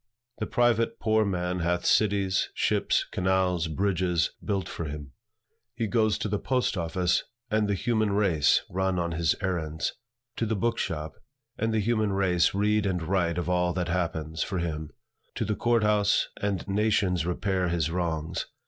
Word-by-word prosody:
The 110 - -2
private 120 -1 +2
poor 110 -1 +3
man 90 -2 -1
hath 85 +1 0
cities, 100 -3 +2
ships, - - +1
canals, 90 -2 +1
bridges, 90 0 0
built 100 -2 -1
for 85 - -5
him. 75 -2 -7 0.6
He 115 -1 -1
goes 110 -1 +2
to - - -2
the 105 0 -1
post 130 -3 0
office, 85 0 0 0.3
and 105 -1 +2
the 100 - +1
human 110 +1 +1
race 95 -8 +3
run 95 0 -1
on 85 -1 -1
his 80 -2 +1
errands; 80 -5 -2 0.4
to 115 - 0
the 110 - 0
book 115 +4 0
shop, 80 -3 -3 0.4
and 115 +1 -1
the 110 - +1
human 110 -1 +1
race 95 -2 +2
read 105 0 +2
and 90 -3 -1
write 85 -1 0
of 90 - -2
all 90 -1 +1
that 90 -1 -2
happens, 80 -2 -2
for 95 - -1
him; 80 -3 -3 0.5
to - - -1
the 105 - 0
court 120 0 +2
house, 105 -1 +2
and 100 -3 -2
nations 100 -4 +1
repair 95 0 0
his 85 -2 0
wrongs. 85 -3 -2
95 Hz, 165 wpm, -27 LUFS, 85-105 Hz, 0.6 s, poor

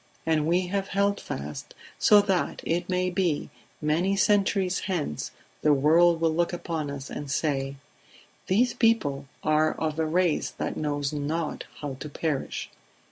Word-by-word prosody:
And 155 -2 +2
we 180 +2 +2
have 195 +2 -2
held 200 +1 +1
fast, 75 +2 -6 0.2
so 210 -1 +7
that, 195 -3 -1
it 175 +2 -1
may 180 0 +1
be, 175 -5 0 0.3
many 165 +6 +1
centuries 195 -2 +2
hence 160 - -2 0.3
the 150 -1 +4
world 165 +4 +5
will 165 -1 +2
look 170 +1 +1
upon 165 -4 -3
us 140 -1 -6
and 145 -1 -5
say: 135 -2 -1 0.7
These 235 +7 +3
people 145 - +1 0.2
are 155 0 +3
of 160 0 -3
a 160 - +2
race 175 0 +1
that - - -2
knows 145 -1 -2
not 150 +2 -2 0.2
how 140 -3 -4
to 150 - -6
perish 145 -1 -2
160 Hz, 150 wpm, -27 LUFS, 150-185 Hz, 0.7 s, so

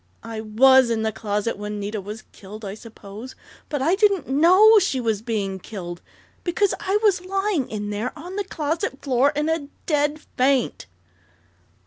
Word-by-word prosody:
"I 225 -1 -6
was 255 +4 +5
in 225 -1 0
the 220 - 0
closet 210 0 -2
when 210 0 -5
Nita 205 +1 -4
was 210 +3 -8
killed, 210 +2 -11
I 195 - -5
suppose, 220 +2 -11 0.3
but 290 -3 -2
I 330 +5 +3
didn't 395 -4 +2
know 370 +10 +6
she 270 -8 0
was 220 -4 -1
being 205 -4 -3
killed! 175 -3 -8 0.4
_Because 370 +3 +1
I 390 +2 +1
was 385 -4 +3
lying 390 -6 -1
in 210 -1 -4
there 215 +5 -2
on 350 +5 -8
the 410 - -1
closet 315 -5 -3
floor 270 +1 +3
in 300 +1 0
a 320 -3 -1 0.2
dead 295 -1 +1 0.2
faint! 260 -1 +1
260 Hz, 165 wpm, -23 LUFS, 215-325 Hz, 0.4 s, know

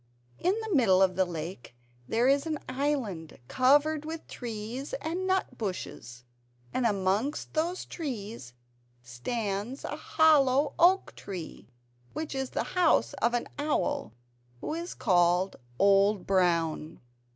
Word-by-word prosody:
In 380 +5 +1
the 440 -2 -3
middle 215 - +5
of 185 -1 +2
the 190 0 +3
lake 165 -7 -7 0.3
there 235 +3 +2
is 280 +3 +3
an 310 -1 -1
island 255 - -2
covered 290 - +3
with 320 +1 -6
trees 235 - -6
and 375 -5 -3
nut 380 0 0
bushes; 125 - -5 0.5
and 250 -2 +2
amongst 205 +7 -1
those 340 +4 -1
trees 220 - -6 0.5
stands 205 - -4
a 290 - -4
hollow 295 -3 +3
oak 370 +3 +4
tree, 180 -5 -8 0.5
which 310 -1 -4
is 265 -1 -2
the - - -2
house 320 - +3
of 235 +2 +2
an 240 - -1
owl 290 - -1 0.5
who - - -4
is 340 +2 -5
called 180 -2 +2 0.2
Old 200 +1 +4
Brown. 170 -4 +1
240 Hz, 130 wpm, -29 LUFS, 185-300 Hz, 0.5 s, middle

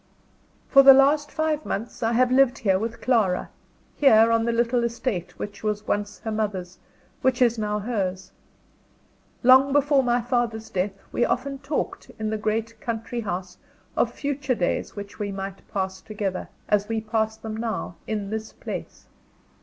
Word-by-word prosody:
For 275 - +7
the 270 0 +10
last 290 +2 +4
five 310 -1 -1
months 220 +4 -4
I 230 0 +1
have 250 +1 +3
lived 265 0 +4
here 190 -3 +2
with 230 +2 -4
Clara 215 -8 +1 0.4
here, 225 -5 +6
on 230 0 +2
the 235 - +1
little 235 +1 +1
estate 235 -6 -3
which 205 -1 -7
was 210 -1 -2
once 205 0 -1
her 220 - -4
mother's, 200 -4 -3 0.4
which 260 -2 +2
is 235 -2 +3
now 210 -1 -1
hers. 195 -4 -3 1.1
Long 260 +2 +7
before 285 0 +4
my 245 -1 +2
father's 235 -2 -1
death 195 +1 -1
we - - +1
often 275 +3 -1
talked, 280 +2 -3
in 220 0 -2
the 220 - -1
great 220 +1 -2
country 230 +1 -3
house, 180 -3 -5 0.4
of 235 - +2
future 280 -1 -2
days 175 - -1
which 200 -2 -8
we 205 -1 -2
might 195 0 -6
pass 190 -1 -2
together, 200 -2 -4 0.2
as 210 0 +1
we 225 -1 0
pass 220 0 -1
them 220 -1 -6
now, 220 -6 -3
in 210 -2 -3
this 220 0 -4
place. - - -7
225 Hz, 165 wpm, -25 LUFS, 205-250 Hz, 1.1 s, the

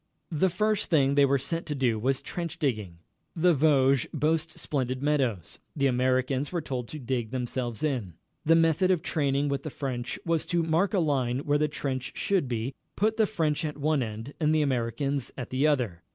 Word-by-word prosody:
The 170 +4 +2
first 210 +3 0
thing 140 -4 +3
they 140 0 +5
were 140 +1 +3
set 165 +6 -3
to 150 - -2
do 120 -5 +1
was 130 +4 0
trench 175 -1 -4
digging. 110 - -2 0.4
The 175 +1 +4
Vosges 140 -3 +3
boast 155 +2 0
splendid 130 -2 -2
meadows. 130 - 0 0.2
The 140 - +1
Americans 130 +2 +1
were 175 - -1
told 130 -6 -4
to 155 - -7
dig 120 -4 -2
themselves 125 0 -3
in. 120 - -1 0.3
The 165 +2 +5
method 165 +2 +3
of 180 -4 +2
training 140 -2 0
with 140 -1 -1
the 155 - -5
French 125 -4 -4
was 165 -2 0
to 170 -1 +1
mark 165 +6 +1
a - - +3
line 135 -5 +1
where 145 0 +1
the 150 - +2
trench 135 -3 -4
should 195 -9 +1
be, 120 +2 -2 0.2
put 215 +2 +1
the 220 -2 +4
French 160 -7 0
at 150 -2 -3
one 150 0 +1
end 115 +4 -5
and 155 -1 +2
the 155 - +3
Americans 135 +1 -1
at 125 - -6
the 135 +4 +2
other. 120 - 0
140 Hz, 195 wpm, -28 LUFS, 130-160 Hz, 0.4 s, they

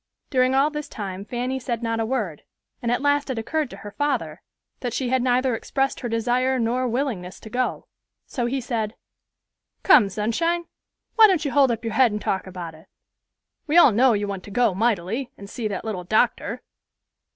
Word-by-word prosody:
During 255 0 +3
all 280 +3 +3
this 300 -1 -5
time 195 -2 -6
Fanny 250 +3 -2
said 240 -2 -3
not 230 0 -1
a 225 - 0
word; 215 - -2 0.4
and 235 - -1
at 245 - 0
last 285 0 +2
it 260 - -2
occurred 295 +5 -1
to - - -10
her 205 - -9
father 290 +6 -2 0.4
that 245 -3 -3
she 255 -3 -1
had 260 0 +2
neither 250 0 +2
expressed 270 +4 -1
her 240 - -4
desire 245 +3 +1
nor 245 +2 0
willingness 235 -8 -3
to 220 - -11
go; 250 +2 -1 0.4
so 240 -2 -2
he 265 +3 -1
said, 230 -4 -3 0.9
"Come, 265 - +6
Sunshine, 325 - 0 0.5
why 440 -1 +9
don't 355 -6 +1
you 280 - -1
hold 280 -2 +4
up 230 -1 -2
your 225 - -2
head 245 0 +4
and 210 - -2
talk 190 -2 -2
about 175 -3 -7
it? 160 +1 -17 0.8
We 305 +3 +3
all 315 -7 +8
know 245 +3 +4
you 205 -1 -1
want 195 -2 -5
to - - -10
go 230 0 +2
mightily, 225 +4 0
and 200 - -10
see 220 +2 -4
that 200 +1 -4
little 200 -5 -3
doctor." 215 +5 0
240 Hz, 195 wpm, -24 LUFS, 210-265 Hz, 0.9 s, why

